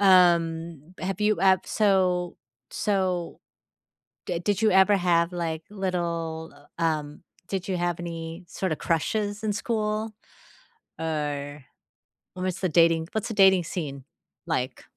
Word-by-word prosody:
Um, 170 -4 +3
have 190 +1 -3
you 210 0 +2
ev 190 -1 +5
so 185 -4 +1 0.3
so 185 -4 -1 0.9
D 170 -1 -2
did 205 +2 0
you 220 -1 +4
ever 190 +2 +6
have, 170 -1 +2
like, 165 -2 -3
little, 170 -5 -3 0.2
uh, - - -6
um 155 -1 -1 0.2
did 190 -2 -3
you 185 -2 -1
have 175 -1 -1
any, 165 0 -6
sort 190 0 -3
of, 155 - -1
crushes 205 +6 -1
in 210 -1 0
school? 215 -1 -2 0.9
Or, 145 -3 -3 0.7
what's 185 0 -3
the 185 -2 0
dating 165 0 +4
What's 220 - -2
the - - -3
dating 190 -3 +6
scene 145 -6 -5 0.4
like? 130 -6 -2
175 Hz, 130 wpm, -26 LUFS, 165-195 Hz, 0.9 s, ever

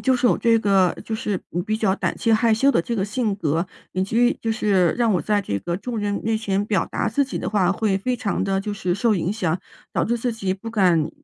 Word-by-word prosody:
就 260 -1 +2
是 245 - +2
我 - - +3
这 230 -1 +3
个 195 -3 +3
就 220 - -3
是 205 -3 -2 0.3
比 215 0 0
较 200 -3 +1
胆 - - -2
气 230 - +1
害 225 0 +4
羞 270 +6 +3
的 - - +3
这 235 +7 -3
个 190 - 0
性 215 0 -1
格， 165 0 0 0.3
以 185 - 0
及 235 +5 +2
就 225 - -1
是 195 -5 +2
让 235 -3 +2
我 180 - +1
在 205 +5 0
这 100 - -2
个， 170 - -3
众 235 +3 -4
人 205 -1 -1
面 225 0 +1
前 200 -2 -1
表 205 -2 0
达 - - -2
自 285 - +1
己 270 - -4
的 - - -3
话， 190 -4 +2
会 195 -1 0
非 250 +5 -1
常 225 -6 -2
地 195 0 0
就 210 0 -3
是 185 -4 -1
受 220 +2 +2
影 175 -1 -1
响， 180 -5 -1 0.3
导 - - +1
致 235 - +1
自 240 +1 -2
己 195 -4 -2
不 225 +4 -8
敢 175 -7 +2
205 Hz, 280 characters per minute, -22 LUFS, 190-225 Hz, 0.3 s, 害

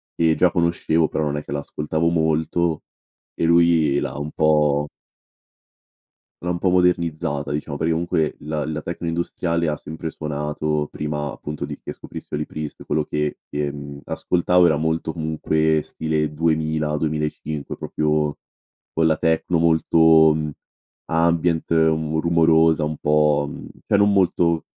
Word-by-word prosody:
Ehm, 80 -1 +2
già 90 - +4
conoscevo, 85 -1 +1
però 80 - -2
non 75 0 -2
è 75 - -4
che - - -10
l'ascoltavo 75 +3 -1
molto, 80 0 0 0.5
e - - 0
lui 85 -4 +4
l'ha - - -4
un 75 +1 -5
po' 75 -2 +2 1.5
l'ha 90 - -2
un 85 - -3
po' 95 - +2
modernizzata 85 -5 +1
diciamo, 75 0 -3
perché 80 +2 0
comunque, 80 -2 0
la 75 0 -3
la 75 0 -4
techno 85 0 -5
industriale, 85 0 -1
ha 75 - -1
sempre 80 +1 -7
suonato, 75 0 -2
prima 75 -1 -3
appunto 75 0 -6
di - - -7
che - - -6
scoprissi - - -8
Holy 75 0 -2
Priest, 75 0 -7
quello 75 0 0
che, 75 0 -2
ehm, 70 -1 -5
ascoltavo 90 0 +2
era 80 - +3
molto, 80 +1 -1
comunque, 80 -1 0
stile 75 -1 -2
2000, 80 -1 0
2005, 75 -1 -3
proprio, 75 -1 -1 0.6
quella 80 -1 +2
techno 80 +1 +1
molto, 80 -1 +5
mhmm, 75 -1 -2 0.5
ambient, 85 0 +1
mhmm, 80 -1 +2
rumorosa, 80 -1 +3
un 75 0 -2
po', 75 -1 +2
mhmm, - - -9 0.2
cioè - - +3
non 100 0 +4
molto 85 -4 +2
80 Hz, 145 wpm, -22 LUFS, 75-85 Hz, 1.5 s, molto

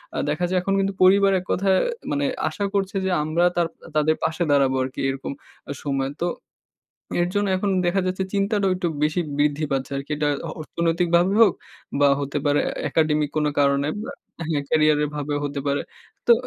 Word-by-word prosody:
আ - - -2
দেখা 155 +4 0
যায় 185 - +1
এখন 195 +2 -1
কিন্তু 195 0 0
পরিবার 195 +1 +6
এক 180 - -11
কথায় 190 0 +2 0.3
মানে 285 -1 0 0.2
আশা 205 - -3
করছে 195 -1 -1
যে - - +1
আমরা 160 +3 +1
তার 175 -1 +2 0.3
তাদের 155 +1 +3
পাশে 160 +2 0
দাঁড়াবো 135 -2 +3
আরকি 130 0 -6
এরকম 135 0 -4 0.5
সময়। 135 -1 -1
তো 175 - +1 0.9
এর 175 - +2
জন্য 205 0 +1
এখন 200 +2 -1 0.2
দেখা 185 +3 +2
যাচ্ছে 185 +1 -1
চিন্তাটাও 200 0 +1
একটু 180 -1 -1
বেশি 155 +4 +1 0.2
বৃদ্ধি 150 +1 +1
পাচ্ছে 135 0 -2
আরকি। 140 +2 -6
এটা 150 0 0 0.3
অর্থনৈতিকভাবে 170 +3 +1
হোক 205 -5 +6 0.5
বা 145 - +6
হতে 140 +1 -2
পারে 145 0 +3
এ - - -4 0.2
একাডেমিক 155 -2 +2
কোন 155 - +2
কারণে 140 0 +2
বা - - -6 0.6
ক্যারিয়ার 155 -1 +3
এর - - -2
ভাবে 145 0 -2
হতে 140 -1 -3
পারে। 140 0 +1 0.4
তো 240 - +8
160 Hz, 180 wpm, -23 LUFS, 145-190 Hz, 0.9 s, তো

